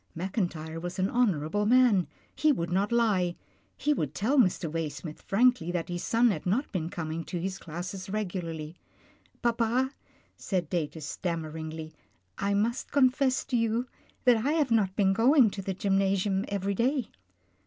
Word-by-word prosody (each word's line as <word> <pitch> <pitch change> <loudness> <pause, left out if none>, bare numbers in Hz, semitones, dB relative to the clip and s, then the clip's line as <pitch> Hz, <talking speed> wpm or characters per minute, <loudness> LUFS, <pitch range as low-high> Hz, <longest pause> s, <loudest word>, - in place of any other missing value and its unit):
Mackin 185 +2 -1
tyre 160 0 -7
was 175 +2 -5
an 190 +1 0
honourable 205 -4 +1
man. 240 -6 +5 0.3
He 310 - +3
would 170 -10 -2
not 195 +4 +1
lie, 200 -7 +2 0.4
he 295 - +2
would - - -3
tell 260 +8 +2
Mr. 185 -6 +2
Waysmith 155 0 -5
frankly 215 -5 +2
that 175 0 -3
his 175 0 -3
son 235 0 +3
had 170 -2 -4
not 235 +11 0
been 170 -4 -2
coming 165 -1 -4
to 180 - -4
his 190 +2 -3
classes 180 +3 -6
regularly. 175 -6 -4 0.7
Papa," 235 +2 +1 0.4
said 180 -5 -2
Datus, 160 -3 -2
stammeringly, 160 -1 -4 0.2
" 90 +1 -44
I 200 - +2
must 230 +5 -1
con 265 -3 +5
fess 265 -1 0
to 255 - -2
you 230 +1 +1 0.4
that 245 -2 +5
I 290 +4 +1
have 300 -6 +1
not 200 -4 +2
been 195 -2 +3
going 240 +1 +5
to 195 - -5
the 190 0 -3
gym 195 0 +1
nasium 195 0 +1
every 200 0 -1
day." 250 +4 0
195 Hz, 170 wpm, -28 LUFS, 170-235 Hz, 0.7 s, man